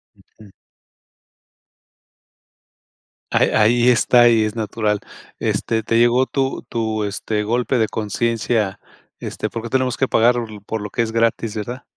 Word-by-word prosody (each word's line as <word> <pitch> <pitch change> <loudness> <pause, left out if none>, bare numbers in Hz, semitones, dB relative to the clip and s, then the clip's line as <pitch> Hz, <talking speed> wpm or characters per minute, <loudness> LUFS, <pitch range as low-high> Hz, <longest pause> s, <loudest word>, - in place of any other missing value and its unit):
Ujú. 105 -2 -19 2.8
Ahí - - +3
ahí 120 +3 +3
está 120 0 +5
y 115 -2 +3
es 105 +1 -4
natural. 105 -1 -1 0.4
Este, 110 -1 -1
¿te 115 +1 +1
llegó 120 +2 +3
tu 135 -1 -2
tu, 110 -2 -2
este, 105 +1 -2
golpe 120 +4 0
de 110 -2 +1
conciencia? 110 -1 -1 0.4
Este, - - -4
¿por 115 - -6
qué 115 - -6
tenemos 130 -2 0
que 135 - +1
pagar 120 +2 +3 0.3
por 110 - -3
lo 105 - -5
que 120 - -1
es 115 -1 -1
gratis, 115 -1 0
verdad? 120 +5 -5
115 Hz, 140 wpm, -20 LUFS, 110-120 Hz, 2.8 s, está